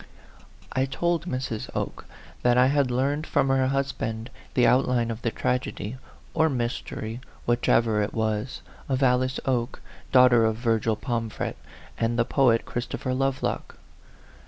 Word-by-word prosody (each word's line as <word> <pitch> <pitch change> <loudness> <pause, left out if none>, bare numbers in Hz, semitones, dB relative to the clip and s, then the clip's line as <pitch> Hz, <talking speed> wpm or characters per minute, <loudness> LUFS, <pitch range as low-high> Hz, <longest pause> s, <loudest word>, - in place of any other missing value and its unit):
I 130 - +1
told 170 +5 -1
Mrs, 130 -6 -3
Oke - - -4 0.3
that 120 0 +3
I 125 - +6
had 140 -1 +2
learned 140 +5 0
from 135 -2 +2
her 135 -1 +3
husband 130 -4 -2 0.2
the 125 - +4
outline 125 -1 +3
of 115 0 -6
the 115 - 0
tragedy, 125 -2 -2 0.4
or 160 0 +3
mystery, 120 -2 -3 0.2
whichever 115 -2 +2
it 105 - -1
was, 110 +2 -2 0.3
of 135 0 +1
Alice 130 0 +2
Oke, 125 -2 -1 0.3
daughter 125 -3 +6
of 110 -1 +2
Virgil 115 -1 +1
Pomfret, 115 0 -3 0.4
and 115 +1 +1
the 120 - +3
poet, 125 -4 +3
Christopher 125 +1 -3
Lovelock. 135 0 -1
125 Hz, 135 wpm, -26 LUFS, 115-135 Hz, 0.4 s, I